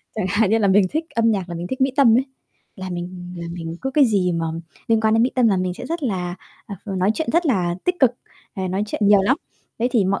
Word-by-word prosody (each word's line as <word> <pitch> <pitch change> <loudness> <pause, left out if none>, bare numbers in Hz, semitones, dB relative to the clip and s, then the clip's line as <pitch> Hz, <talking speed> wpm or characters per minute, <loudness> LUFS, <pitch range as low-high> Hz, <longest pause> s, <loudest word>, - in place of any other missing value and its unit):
Chẳng 210 -4 -2
hạn 205 +1 +2
như 225 - +3
là 200 -2 +2
mình 195 0 +5
thích 315 +1 -1
âm 230 0 +3
nhạc 190 -4 -1
là 170 - -5
mình 170 +1 -5
thích 260 +5 -5
Mỹ 265 0 +2
Tâm 240 -5 +6
ấy. 265 - 0 0.5
Là 190 -1 -6
mình 180 0 -6
là 170 0 -6
mình 165 -1 -6
cứ 265 - -1
cái 285 0 +4
gì 195 -6 +1
mà 165 -1 -1 0.4
liên 225 -1 +3
quan 220 0 +2
đến 225 - +4
Mỹ 250 - +2
Tâm 245 -3 +4
là 195 - +2
mình 185 -1 -1
sẽ 245 - -8
rất 330 +2 -4
là 180 -7 -2 0.3
à, 200 - -7
nói 190 0 0
chuyện 320 - -3
rất 340 0 +2
là 180 -9 +1
tích 360 - +1
cực, 255 -3 +5 0.4
ờ, 190 -2 -3
nói 190 +3 -1
chuyện 210 - -4
nhiều 205 -1 +6
lắm. 250 +8 +2 0.4
Thế 240 +2 +1
thì 215 -6 +3
mọi 195 +1 0
205 Hz, 275 wpm, -21 LUFS, 185-245 Hz, 0.5 s, Tâm